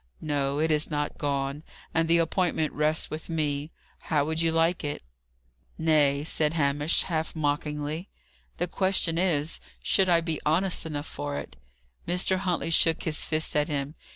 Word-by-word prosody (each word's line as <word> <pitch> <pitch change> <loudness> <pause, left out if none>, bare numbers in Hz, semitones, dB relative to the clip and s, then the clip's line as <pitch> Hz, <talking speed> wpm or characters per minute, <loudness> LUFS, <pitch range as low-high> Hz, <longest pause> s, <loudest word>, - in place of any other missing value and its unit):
"No, 140 -2 -1
it 160 +1 +1
is 150 0 +2
not 145 -1 -2
gone. 140 0 -1 0.3
And 165 0 +2
the 170 +1 +5
appointment 165 -1 +1
rests 155 +1 0
with 155 +2 -6
me. 150 -2 -1 0.3
How 150 -3 0
would 160 +1 -1
you 165 -1 +2
like 165 +2 +2
it?" 145 - -4 0.7
"Nay," 150 -3 +3
said 155 0 +1
Hamish, 145 0 +2
half 160 -3 -2
mockingly: 150 +2 -2 0.5
"the 175 - 0
question 185 -2 +1
is, 165 -4 +1 0.2
should 190 -2 +4
I 170 -1 +6
be 165 -2 -3
honest 170 +2 +1
enough 150 -2 -4
for 70 0 -5
it?" 70 - -7 0.5
Mr. 180 +2 +1
Huntley 180 -3 -1
shook 165 0 +3
his 155 -2 -1
fist 155 -1 0
at 150 0 +2
him. 145 -1 -2
155 Hz, 160 wpm, -27 LUFS, 145-165 Hz, 0.7 s, I